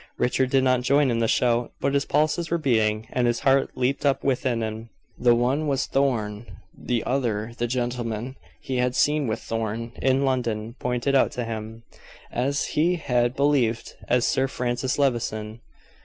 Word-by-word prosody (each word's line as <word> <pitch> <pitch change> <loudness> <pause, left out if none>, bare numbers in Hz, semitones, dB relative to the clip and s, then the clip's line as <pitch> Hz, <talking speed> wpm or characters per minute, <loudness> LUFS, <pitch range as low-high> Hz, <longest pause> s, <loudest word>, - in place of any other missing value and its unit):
Richard 130 +1 +1
did 135 0 +3
not 130 -1 +3
join 140 +1 +3
in 115 - 0
the 115 - +2
shout, 120 +1 +1
but 140 - 0
his 140 0 +1
pulses 155 +3 +1
were 170 - +1
beating, 110 -7 +1
and 125 -1 +2
his 120 0 0
heart 135 0 +2
leaped 130 +2 0
up 140 -2 +1
within 125 -3 0
him. 110 +1 -5 0.3
The 120 -1 +5
one 130 +6 +1
was 140 -2 0
Thorn; 115 -5 -1 0.3
the 120 -2 -2
other 120 -4 -1
the 120 - 0
gentleman 120 0 -3 0.2
he 130 - -4
had 125 0 0
seen 150 -2 +2
with 110 0 -2
Thorn 115 +1 -3
in 135 +1 +2
London, 115 -4 -1
pointed 125 +2 -1
out 135 - +4
to 120 - -3
him 110 0 -6 0.5
as 140 +4 0
he 170 +4 +2
had 125 -6 0
believed 135 -5 +1
as 125 0 +2
Sir 135 0 +1
Francis 125 0 -2
Levison. 115 -5 -1
125 Hz, 170 wpm, -24 LUFS, 115-135 Hz, 0.5 s, The